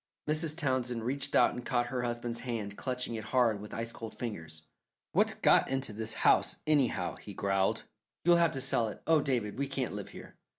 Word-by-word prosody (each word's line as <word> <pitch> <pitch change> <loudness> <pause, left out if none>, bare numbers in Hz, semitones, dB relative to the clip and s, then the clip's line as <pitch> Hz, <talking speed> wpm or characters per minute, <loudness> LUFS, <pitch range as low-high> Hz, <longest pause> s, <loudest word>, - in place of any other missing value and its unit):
Mrs. 155 +1 +1
Townsend 130 -6 -1
reached 135 +4 -1
out - - +6
and 125 - -6
caught 120 -2 +1
her 125 - 0
husband's 120 0 -3
hand, 110 -5 -4
clutching 125 -1 -3
it 110 -1 -5
hard 115 -3 +2
with 105 - -9
ice 115 +1 -3
cold 115 -1 -8
fingers. 80 -9 -6 0.5
"What's - - +3
got - - +4
into 135 -4 -2
this 110 +1 -4
house, - - +4
anyhow?" 130 - +1
he 100 - -10
growled. 95 -1 +1 0.4
"You'll 175 0 +6
have 170 -1 +4
to 135 - -1
sell 130 -4 +2
it. 105 - -8
Oh, 160 -2 +4
David, 125 -5 -1
we 140 - 0
can't 135 -5 -2
live 100 -1 -6
here." - - -12
120 Hz, 200 wpm, -31 LUFS, 110-135 Hz, 0.5 s, out